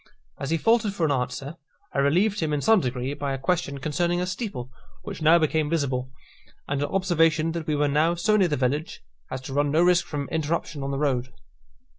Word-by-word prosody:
As 140 - -4
he 165 - +2
faltered 225 +1 +2
for 170 - +1
an 150 - +1
answer, 130 +4 -3 0.4
I - - 0
relieved 185 +10 +2
him 155 -2 -1
in 145 - 0
some 220 +3 +5
degree 125 -2 -2
by 145 -1 -3
a - - -2
question 140 -1 -1
concerning 170 +5 0
a 180 - 0
steeple, 180 - -5 0.3
which - - -7
now 160 +2 +6
became 155 -2 +1
visible, 130 -5 -1 0.6
and 140 0 -1
an 145 - -1
observation 165 -4 +2
that 165 -1 -5
we 155 - +1
were 145 0 +2
now 155 +4 +2
so 210 +5 +2
near 195 -4 +4
the 150 - -1
village 135 - -2 0.3
as 130 - -5
to 135 - -7
run 145 +1 +2
no 160 +4 +3
risk 180 0 +3
from 145 -2 -4
interruption 160 -1 -2
on 135 - -3
the 140 - -2
road. 130 -3 0
150 Hz, 215 wpm, -25 LUFS, 140-170 Hz, 0.6 s, now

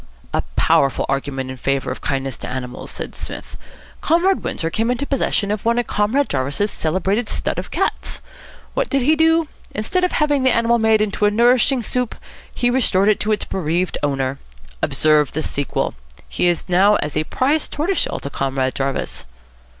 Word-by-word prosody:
"A - - +1
powerful 135 -1 +3
argument 135 -1 -2
in 130 - -8
favour 135 0 -1
of 130 - -6
kindness 135 -2 -2
to - - -6
animals!" 125 -1 -6
said - - -6
Psmith. - - -8 0.5
"Comrade 360 +4 +2
Windsor 165 0 -2
came 225 +5 0
into 250 +3 0
possession 235 -7 0
of 210 -1 -2
one 235 +1 +2
of 245 - +1
Comrade 220 +9 +1
Jarvis's 140 +10 -1
celebrated 190 +7 0
stud - - -1
of - - -6
cats. - - -2 0.5
What - - -1
did 275 -2 +1
he 305 +5 +4
do? 325 0 +3 0.3
Instead 225 - 0
of 360 - +1
having 290 -2 +2
the 260 - +4
animal 235 0 +3
made 220 -1 +4
into 210 0 0
a - - +5
nourishing 240 +3 +3
soup, 250 +1 -1 0.4
he 245 -1 +1
restored 210 -6 +3
it 215 - +3
to 215 - 0
its 210 - 0
bereaved 175 0 -1
owner. 135 -2 -1 0.4
Observe 150 +1 +3
the 155 - -2
sequel. 140 -1 -2 0.3
He - - 0
is 175 0 0
now 190 +3 +4
as 150 -5 -2
a 155 - +1
prize 290 - +1
tortoiseshell 345 +6 -1
to 140 - -5
Comrade 135 -1 -1
Jarvis." 135 0 -3
205 Hz, 180 wpm, -20 LUFS, -, 0.5 s, a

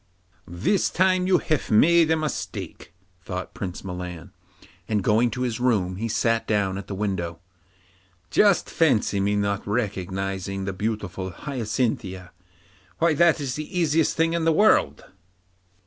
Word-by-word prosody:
'This 95 - 0
time 185 0 +2
you've 165 -5 +1
made 165 +9 +5
a 160 - +4
mistake,' 155 - -5 0.3
thought 90 +1 -6
Prince 90 -3 -6
Milan, 90 -3 -7 0.6
and 105 -3 0
going 110 +4 +3
to 125 +3 -5
his 120 -2 -2
room 100 -8 +1
he 115 +3 -2
sat 115 +1 0
down 100 -3 +1
at 100 - -9
the 100 - -5
window. 95 -5 -3 0.9
Just 200 -3 +4
fancy 120 -10 +2
my 100 +1 +1
not 100 -1 0
recognising 95 -2 -3
the 95 - -3
beautiful 100 -2 -3
Hyacinthia! 110 - -3 0.7
Why, 165 -1 +3
that 165 +1 +4
is 135 -3 -3
the 155 +5 -4
easiest 160 -1 +2
thing 165 +1 +2
in 170 -1 0
the 165 - +3
world. 155 - +3
105 Hz, 140 wpm, -24 LUFS, 95-155 Hz, 0.9 s, made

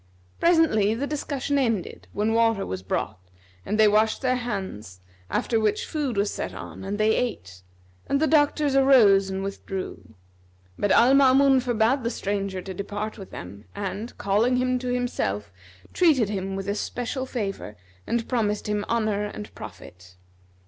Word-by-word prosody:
Presently 315 - +3
the 265 +5 -2
discussion 285 -1 -2
ended 225 -8 -2
when 215 +2 0
water 225 -3 +2
was 95 0 -5
brought 95 - -3 0.4
and 215 - -2
they 215 - +7
washed 215 +4 +2
their 255 -1 +2
hands 190 - -5 0.3
after 225 - 0
which 215 -1 0
food 285 -8 -3
was 200 +1 +1
set - - -5
on - - -8
and 200 +2 -3
they 215 +1 +3
ate; 95 - -3 0.5
and 280 - +1
the 315 - +3
doctors 295 -2 +2
arose 225 -8 +5
and 190 0 -3
withdrew; 195 - -6 0.6
but 205 - -1
Al 245 +3 +6
Maamun 270 0 +5
forbade 240 +1 +1
the 230 - 0
stranger 195 -4 -3
to 190 - -6
depart 205 +3 -5
with 195 - -9
them 100 +4 -9
and, 200 +3 -5
calling 215 +6 +2
him 255 0 +1
to 250 - -5
himself, 240 - -2 0.4
treated 290 - +3
him 195 -1 -3
with 195 0 -5
especial 245 +5 -3
favour 195 - -4 0.3
and 235 -1 -1
promised 210 -4 0
him 210 0 -1
honour 215 -3 0
and 210 0 -8
profit. 90 0 -12
215 Hz, 155 wpm, -25 LUFS, 195-255 Hz, 0.6 s, they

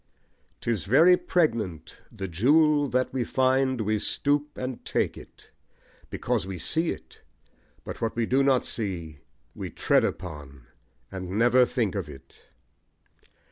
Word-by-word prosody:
'Tis 115 -7 -2
very 160 - +6
pregnant: 115 - -1
The 95 - -6
jewel 145 - +3
that 125 +1 0
we 130 -2 0
find 130 0 +1
we 110 0 0
stoop 145 +6 -1
and 130 -1 -5
take - - -1
it, - - -15 0.6
Because - - -2
we 95 -1 -5
see 160 - 0
it; - - -8 0.6
but - - -8
what 115 - -1
we 115 -1 0
do 130 +4 +2
not 135 -2 +3
see 85 -9 -5 0.3
We - - -6
tread - - +2
upon, 75 -7 -6 0.5
and 95 -2 -6
never 120 +2 +5
think 115 -6 -1
of 95 -6 -4
it. 70 -2 -15
120 Hz, 140 wpm, -26 LUFS, 95-135 Hz, 0.6 s, very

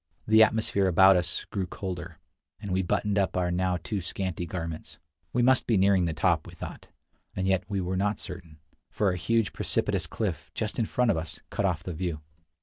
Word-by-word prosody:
The 110 0 +6
atmosphere 110 -3 +3
about 95 +2 +7
us 85 -2 -1
grew 95 -4 -2
colder, 90 -3 -6 0.4
and 100 -2 -6
we 95 +1 +2
buttoned 100 +3 0
up 95 -2 0
our 90 -1 +1
now 90 0 +1
too 95 +4 -4
scanty 90 -1 -3
garments. 85 -2 -6 0.3
We 125 - +1
must 130 +1 +4
be 115 - +3
nearing 95 -1 +4
the 85 - 0
top, - - +1
we - - -11
thought, - - -8 0.5
and 95 - -1
yet 95 -1 +1
we 100 -2 -1
were 90 +1 -2
not 105 +2 0
certain, 90 -4 -9 0.3
for 100 -3 +1
a - - -2
huge, 110 +4 +1
precipitous - - 0
cliff, - - -3
just 110 +2 -2
in 110 - +1
front 125 -2 +2
of 85 - 0
us, 80 -1 -5
cut 100 - 0
off 90 -5 0
the 90 - -5
view. 85 -2 -3
95 Hz, 205 wpm, -28 LUFS, 90-100 Hz, 0.5 s, about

